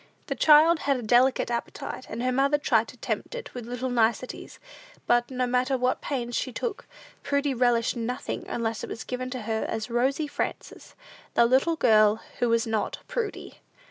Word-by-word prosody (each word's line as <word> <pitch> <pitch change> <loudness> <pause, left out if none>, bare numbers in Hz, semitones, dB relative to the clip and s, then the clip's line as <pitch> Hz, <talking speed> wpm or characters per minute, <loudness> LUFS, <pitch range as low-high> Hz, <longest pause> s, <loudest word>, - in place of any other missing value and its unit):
The - - -2
child 315 +2 +6
had 275 -1 +1
a 245 - -6
delicate 245 +3 +3
appetite, 235 0 -5
and 235 - -4
her 255 - +1
mother 275 +3 +2
tried 230 -6 +2
to 250 - -12
tempt 485 - -4
it - - -7
with 245 -2 -7
little 250 +1 -3
niceties; 235 +1 -1 0.5
but, 240 0 +2
no 255 -1 -1
matter 255 +2 +1
what 250 +1 0
pains 240 -4 -3
she 260 - -1
took, 435 - -4 0.3
Prudy 280 0 0
relished 240 -1 +2
nothing 240 +1 -4
unless 225 -2 -3
it - - -5
was 225 - -6
given 255 0 -4
to 255 -3 -5
her 220 0 -1
as 225 +1 -4
Rosy 265 +6 +1
Frances, 290 - -5 0.4
the 235 - +6
little 265 +7 +3
girl 215 -6 +4 0.2
who 240 - +2
was 230 0 +2
not 220 -2 -2
Prudy. 450 -4 -4
250 Hz, 180 wpm, -26 LUFS, 235-270 Hz, 0.5 s, child